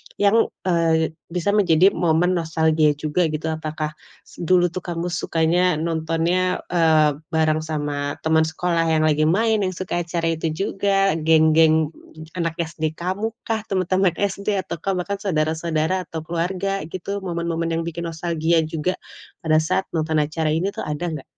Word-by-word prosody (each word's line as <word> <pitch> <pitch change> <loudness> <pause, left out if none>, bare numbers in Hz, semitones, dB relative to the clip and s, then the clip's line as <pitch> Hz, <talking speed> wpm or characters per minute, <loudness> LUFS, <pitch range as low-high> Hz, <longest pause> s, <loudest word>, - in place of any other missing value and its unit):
yang, 205 +3 +3 0.2
eee, 165 -3 +2 0.2
bisa 180 +3 -1
menjadi 190 -2 +4
momen 170 +1 +2
nostalgia 160 -2 +2
juga 155 +4 0
gitu, 160 +1 -3
apakah 155 -1 -4 0.3
s - - -18
dulu 175 0 +3
tuh 185 - -4
kamu 175 0 -4
sukanya 170 +1 +1
nontonnya, 165 +3 0
eee, 155 -4 +3
bareng 155 -2 +1
sama 145 -2 -3
teman 160 0 +3
sekolah 165 +1 0
yang 155 - +2
lagi 155 0 +3
main, 220 +6 +2
yang 185 -2 -1
suka 180 -1 -3
acara 165 -1 -1
itu 165 0 -2
juga, 195 -1 +1
geng-geng 160 0 +4 0.4
anak 165 -2 -2
SD 160 -1 -4
kamukah? 220 +6 -3
Teman-teman 185 -1 +1
SD? 200 +1 -1
Ataukah 190 0 -3
bahkan 195 +2 -3
saudara-saudara 160 -1 -1
atau 160 -1 -6
keluarga 180 +4 -2
gitu 190 +3 -5
momen-momen 170 -2 -2
yang 165 - -1
bikin 170 +1 -4
nostalgia 165 0 0
juga, 160 +3 -2 0.5
pada 155 -1 +3
saat 170 +4 0
nonton 160 -1 -1
acara 155 +2 -2
ini 165 +6 0
tuh, - - -6
ada 160 +3 -3
nggak? 150 -4 -6
165 Hz, 150 wpm, -22 LUFS, 160-185 Hz, 0.5 s, menjadi